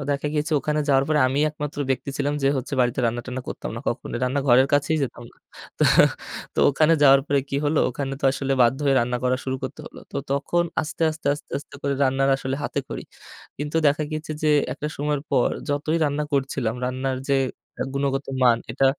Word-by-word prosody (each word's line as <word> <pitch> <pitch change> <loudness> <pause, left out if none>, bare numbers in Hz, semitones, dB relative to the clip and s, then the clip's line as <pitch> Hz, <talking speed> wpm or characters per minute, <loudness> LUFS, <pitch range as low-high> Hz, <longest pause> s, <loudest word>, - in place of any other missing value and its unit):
আ - - -4
দেখা 140 +1 -1
গিয়েছে 150 +2 -1
ওখানে 150 +1 0
যাওয়ার 135 -1 +4
পরে 155 -1 +2
আমিই 140 +4 +1
একমাত্র 150 -1 -6
ব্যক্তি 135 +1 -1
ছিলাম 145 +1 0
যে 135 - +4
হচ্ছে 130 +2 -4
বাড়িতে 125 +1 +1
রান্না-টান্না 120 +2 -3
করতাম - - -5
না - - -4
কখনোই। - - -3
রান্নাঘরের 130 -1 +4
কাছেই 145 +2 +2
যেতাম 120 -2 -4
না। - - -27 0.4
তো - - +1 0.7
তো - - -6
ওখানে 155 +3 +3
যাওয়ার 135 -1 +7
পরে 140 -2 +2
কী 140 - -2
হলো, 150 +1 +2
ওখানে 135 +2 -4
তো - - -5
আসলে 135 0 -2
বাধ্য 120 +3 +3
হয়ে 135 - +4
রান্না 125 +1 0
করা 125 0 +2
শুরু 130 0 -2
করতে 130 - -5
হলো। - - -11
তো - - -4
তখন 145 +5 +1 0.2
আস্তে, 155 - -5
আস্তে, 155 0 -9
আস্তে, 145 - -13
আস্তে 145 - -14
করে 140 0 0
রান্নার 135 +1 +2
আসলে 135 0 -3
হাতেখড়ি। - - -4 0.6
কিন্তু 145 +2 -3
দেখা 145 +2 +2
গিয়েছে 155 0 -4
যে 155 - +3 0.2
একটা 150 - -5
সময়ের 145 -1 -1
পর 130 -3 +3 0.2
যতই 145 +3 0
রান্না 145 0 0
করছিলাম, 135 -4 0
রান্নার 130 +1 -2
যে 140 - +3 0.5
আ - - +3
গুণগত 140 0 -1 0.2
মান 120 -2 +5
এটা 135 - 0
140 Hz, 200 wpm, -24 LUFS, 130-145 Hz, 0.7 s, যাওয়ার